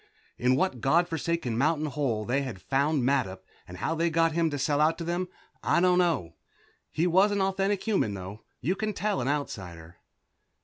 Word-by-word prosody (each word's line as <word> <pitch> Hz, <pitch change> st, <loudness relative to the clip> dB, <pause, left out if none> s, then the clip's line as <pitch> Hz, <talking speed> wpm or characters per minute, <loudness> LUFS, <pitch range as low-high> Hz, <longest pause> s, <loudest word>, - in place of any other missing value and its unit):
In 125 Hz, +1 st, +3 dB
what 135 Hz, -5 st, 0 dB
god 170 Hz, +6 st, +3 dB
forsaken 165 Hz, -8 st, -2 dB
mountain 155 Hz, +2 st, +2 dB
hole 130 Hz, -7 st, -1 dB
they 130 Hz, +5 st, +1 dB
had 130 Hz, -9 st, -5 dB
found 140 Hz, -, +1 dB
Mattup, 95 Hz, -8 st, 0 dB, 0.3 s
and 90 Hz, -, -9 dB
how 160 Hz, -, -1 dB
they 165 Hz, +1 st, +1 dB
got 165 Hz, 0 st, +2 dB
him 165 Hz, 0 st, +1 dB
to 145 Hz, -, -3 dB
sell 145 Hz, +2 st, +1 dB
out 155 Hz, +2 st, +3 dB
to 170 Hz, -, -5 dB
them, 175 Hz, +2 st, -2 dB, 0.3 s
I -, -, +2 dB
don't 180 Hz, 0 st, +4 dB
know. 160 Hz, -, +1 dB, 0.6 s
He 160 Hz, -, 0 dB
was 190 Hz, +4 st, +4 dB
an 205 Hz, -, 0 dB
authentic 195 Hz, +1 st, 0 dB
human, 190 Hz, -, 0 dB
though. 95 Hz, +3 st, -8 dB, 0.2 s
You 175 Hz, +9 st, 0 dB
can 215 Hz, +2 st, -2 dB
tell 205 Hz, -6 st, -1 dB
an 120 Hz, -, -2 dB
Outsider. 90 Hz, -, -4 dB
155 Hz, 190 wpm, -28 LUFS, 125-175 Hz, 0.6 s, don't